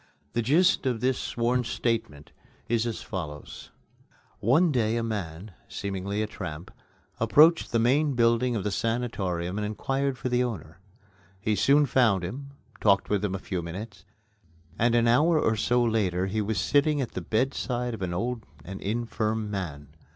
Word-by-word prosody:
The 120 - +1
gist 145 +4 +3
of 120 -3 0
this 130 +1 +1
sworn 120 +1 0
statement 110 -11 -2 0.4
is 115 0 +1
as 115 - -4
follows: 75 -7 -7 0.7
One 155 - +3
day 115 -3 +1
a 115 - -1
man 100 -3 -5 0.2
seemingly 100 +1 -3
a - - 0
tramp 85 -6 -7 0.5
approached 155 +9 +5
the 115 - +2
main 135 +5 +2
building 120 +1 +2
of 105 - -2
the 105 - -1
sanatorium 100 -6 -2
and - - -2
inquired 135 +5 -1
for - - -3
the 125 0 +2
owner. 95 -8 -6 0.6
He 105 +3 0
soon 140 +8 +4
found 120 -8 +3
him, 135 +11 -6 0.3
talked 100 -1 +2
with 105 -1 +1
him 95 -2 -1
a - - -1
few 95 -1 -4
minutes, 100 +6 -8 0.8
and 115 +1 +3
an 120 0 +3
hour 155 +7 +4
or 110 - +2
so 120 +3 +2
later 100 -6 +1
he 105 +3 -1
was 105 -2 -1
sitting 145 - +2
at 130 -4 -2
the 95 - -5
bedside 125 +3 -1
of 110 - -7
an 90 -2 -2
old 115 +6 -2 0.2
and 95 +2 -7
infirm 110 0 -2
man. 75 -8 -5
115 Hz, 165 wpm, -27 LUFS, 95-125 Hz, 0.8 s, approached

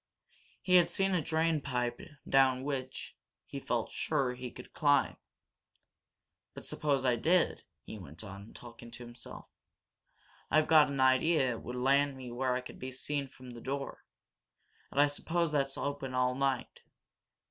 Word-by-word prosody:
He 185 -1 +6
had 170 -1 +5
seen 195 +1 +1
a 180 - +2
drain 160 0 +1
pipe 125 -3 -2 0.3
down 130 -1 +4
which, 130 -2 -4 0.3
he - - -6
felt - - -2
sure, 135 -5 0
he 125 0 -6
could 125 - -12
climb. 145 -2 +3 1.4
"But - - -8
suppose 140 -3 0
I 125 -2 +3
did," 175 +8 +2 0.2
he 110 - -8
went 80 +1 -9
on, 100 +1 -9
talking 120 -1 -11
to 120 +1 -9
himself. 120 0 -9 1.0
"I've 155 +1 +4
got 155 -4 +6
an 140 -1 -3
idea 130 +1 +4
it 115 - -5
would 125 - -6
land 135 +2 +2
me 125 -2 -8
where 125 +1 0
I 130 - -1
could 125 - -11
be 130 +1 -5
seen 140 +2 -2
from 130 -1 -12
the 120 -1 -10
door 140 +2 -4 0.9
and 140 - -2
I 145 - +8
suppose 165 +3 -1
that's 140 -2 0
open 140 -2 -3
all 125 0 +2
night. 135 -1 -1
135 Hz, 160 wpm, -32 LUFS, 125-145 Hz, 1.4 s, I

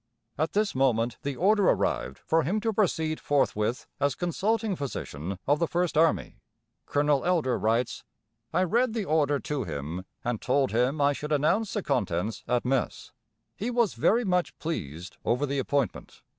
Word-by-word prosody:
At 155 +3 -1
this 210 0 +1
moment 120 -3 +1
the 140 -1 -3
order 200 +5 +4
arrived 65 - 0
for 165 +1 +1
him 185 +9 0
to 225 0 0
proceed 160 -6 +1
forthwith 120 -4 0
as 140 -1 +1
Consulting 205 +4 0
Physician 95 - -5
of 145 +2 +2
the 170 - +1
First 175 0 0
Army. 160 +1 +2 0.5
Colonel 145 -1 +2
Elder 165 -8 +2
writes, 115 +2 0 0.5
"I 185 - +2
read 235 +6 +2
the 215 -3 -1
order 145 -4 +2
to 145 -3 -2
him, 80 +2 -5 0.2
and 120 -3 -2
told 135 +1 +1
him 125 +6 +1
I 145 0 +4
should 150 +2 -6
announce 155 +9 +2
the 210 - -2
contents 95 -5 -1
at 125 0 +1
mess. 130 0 -1 0.4
He 225 - -3
was 235 -4 +2
very 235 +2 +2
much 180 -2 0
pleased 90 - -5
over 125 +5 +1
the 140 0 -1
appointment. 140 -1 -2
145 Hz, 165 wpm, -27 LUFS, 125-180 Hz, 0.5 s, order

